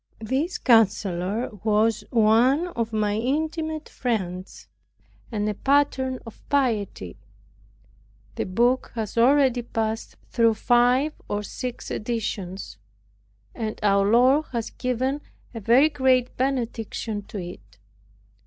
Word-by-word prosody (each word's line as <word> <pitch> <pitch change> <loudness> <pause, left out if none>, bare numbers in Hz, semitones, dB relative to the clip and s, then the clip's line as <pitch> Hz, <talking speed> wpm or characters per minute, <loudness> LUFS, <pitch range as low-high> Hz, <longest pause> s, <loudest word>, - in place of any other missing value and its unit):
This 265 - -1
counselor 205 -2 +2
was 215 +1 +2
one 245 +9 +3
of 230 -8 -3
my 210 -1 0
intimate 315 +5 -2
friends, 185 -6 -4 0.7
and 210 -2 -1
a 210 - 0
pattern 265 +1 +1
of 225 - -12
piety. 220 - -1 1.2
The - - -3
book 240 +7 +1
has 220 -3 -4
already 255 +1 +4
passed 225 -1 -3 0.2
through 230 -2 +3
five 245 +6 +3 0.2
or 205 0 -2
six 245 +4 -6
editions; 200 - -4 0.7
and 220 -1 -4
our 200 -1 +3
Lord 260 +7 +4
has 230 -2 -3
given 260 +3 -2 0.3
a 230 - -5
very 240 +8 +5
great 260 -4 +2
benediction 235 -4 -2
to - - -7
it. 115 - -9
230 Hz, 110 wpm, -24 LUFS, 210-260 Hz, 1.2 s, very